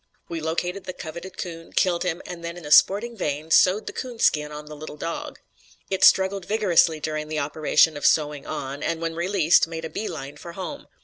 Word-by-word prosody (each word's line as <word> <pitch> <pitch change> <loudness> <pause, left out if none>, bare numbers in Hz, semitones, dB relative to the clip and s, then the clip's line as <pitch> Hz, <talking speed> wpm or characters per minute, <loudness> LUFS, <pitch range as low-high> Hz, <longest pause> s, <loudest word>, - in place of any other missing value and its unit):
"We 165 -1 -4
located 175 +4 -2
the 185 - -5
coveted 170 +3 -8
coon, 165 -2 -7
killed 175 -2 +2
him, 175 -1 -2
and 175 -1 -8
then 170 +1 -5
in 175 - -10
a 150 - -7
sporting 215 +9 +5
vein, 155 -4 -3
sewed 190 +6 +5
the - - -6
coon 250 -2 -6
skin 150 -8 +2
on 150 0 -8
the 150 0 -9
little 150 0 -9
dog. 165 +2 -5 0.5
"It 190 - 0
struggled 190 0 +5
vigorously 180 -7 +3
during 155 0 -3
the 155 0 -4
operation 150 +2 +2
of 145 - +1
sewing 150 -2 +1
on, 140 +2 -5
and 165 - -1
when 165 0 -2
released 170 -1 +3
made 165 0 -6
a 160 - -7
bee 220 - -3
line 145 -3 -7
for 170 +3 -9
home. 195 - -7
165 Hz, 210 wpm, -24 LUFS, 155-185 Hz, 0.5 s, sporting